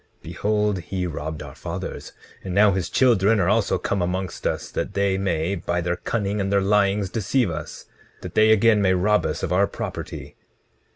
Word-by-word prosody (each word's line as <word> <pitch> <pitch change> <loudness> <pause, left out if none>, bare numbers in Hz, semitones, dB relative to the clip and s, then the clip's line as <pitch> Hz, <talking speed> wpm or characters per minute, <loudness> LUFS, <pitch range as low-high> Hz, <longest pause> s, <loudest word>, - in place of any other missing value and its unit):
Behold, 105 -2 0
he 90 +1 -4
robbed 80 -2 -5
our - - -10
fathers; - - -6 0.3
and 95 -2 -4
now 105 0 +6
his 95 -3 -2
children 115 -4 +3
are 90 - +2
also 105 +2 +2
come 100 - -2
amongst 90 0 -2
us - - -3
that 100 - -4
they 100 -1 +1
may, 90 -2 -1
by 85 -1 -2
their 85 +1 -1
cunning 100 0 -2
and 100 0 -2
their 100 - +4
lyings, 100 0 +2
deceive 115 0 0
us, 80 - -7 0.4
that - - -8
they 110 0 +4
again 110 0 +5
may 95 -1 +3
rob 105 0 +2
us 75 - -4
of 90 - -1
our 100 +2 +3
property. - - -7
100 Hz, 185 wpm, -23 LUFS, 90-105 Hz, 0.4 s, now